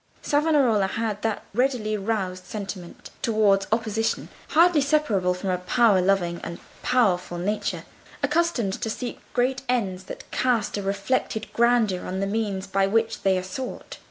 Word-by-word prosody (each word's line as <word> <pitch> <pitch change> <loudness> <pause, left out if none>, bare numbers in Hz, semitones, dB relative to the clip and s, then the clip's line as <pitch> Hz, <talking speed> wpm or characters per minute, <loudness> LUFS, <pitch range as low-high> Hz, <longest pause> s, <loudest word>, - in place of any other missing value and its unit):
Savonarola 285 -9 +3
had 215 0 -2
that 220 -2 -1
readily 240 -3 +1
roused 195 -3 -2
resentment 195 -4 -7
towards 210 -4 +3
opposition, 225 0 0 0.2
hardly 330 -1 +5
separable 230 -12 +2
from 185 +1 -2
a 180 - 0
power 200 +1 +3
loving 180 -2 +1
and 170 0 -5 0.2
powerful 185 -8 +1
nature, 205 +5 -2 0.4
accustomed 295 - +1
to 225 - -1
seek 240 +2 -4
great 255 +2 +1
ends 190 -7 -1
that - - -9
cast 240 -5 +1
a 205 - -2
reflected 200 +3 -1
grandeur 235 -6 +2
on 190 +1 -3
the 195 - 0
means 200 -2 -2
by 195 0 +1
which 225 +2 0
they 190 -1 +3
are 185 - -2
sought. 245 +8 -6
215 Hz, 150 wpm, -25 LUFS, 190-245 Hz, 0.4 s, hardly